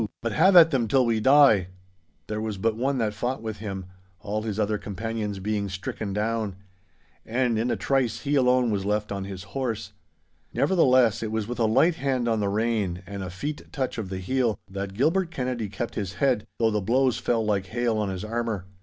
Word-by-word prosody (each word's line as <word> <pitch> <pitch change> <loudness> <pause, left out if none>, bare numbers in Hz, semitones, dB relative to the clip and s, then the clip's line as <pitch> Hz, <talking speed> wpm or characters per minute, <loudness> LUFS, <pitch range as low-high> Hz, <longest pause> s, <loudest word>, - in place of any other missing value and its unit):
But 115 - -2
have 185 - +4
at 165 -2 +9
them 125 -5 +1
till 130 +3 +3
we 115 -2 +1
die!' 130 -7 +6 0.6
There 105 0 -3
was 110 -2 -3
but 110 +3 0
one 135 +4 0
that 110 -3 0
fought 120 +3 -3
with 110 -1 -4
him, 95 -3 -5 0.3
all 105 +1 -3
his 110 -1 -3
other 105 0 0
companions 105 0 -4
being 100 +1 -2
stricken 95 +2 -5
down. 105 -1 -1 0.7
And 120 -1 0
in 120 +3 0
a - - +1
trice 125 -4 0
he 145 0 -2
alone 125 -3 +3
was 100 -2 -1
left 105 +1 -1
on 100 -1 -3
his 95 -2 -7
horse. 115 -6 -3 0.6
Nevertheless, 130 - +4
it 110 -1 -3
was 110 -2 -2
with 120 +1 -5
a 115 - +3
light 160 +10 +3
hand 130 -4 0
on 115 -2 +1
the 100 -1 0
rein 105 -4 -1
and 100 0 -6
a 95 - -5
feat 145 - -6
touch 130 -6 -3
of 100 -4 -4
the 95 - -4
heel, 115 +2 0
that 100 0 -5
Gilbert 165 - +2
Kennedy 125 -8 -3
kept 115 +4 -4
his 100 -5 -4
head, 125 +2 +1
though 115 -1 +2
the 105 -1 0
blows 125 +5 +2
fell 115 -2 0
like 100 -3 0
hail 115 0 0
on 105 -2 -1
his 95 +2 -4
armour. 115 -4 -2
110 Hz, 205 wpm, -26 LUFS, 105-125 Hz, 0.7 s, at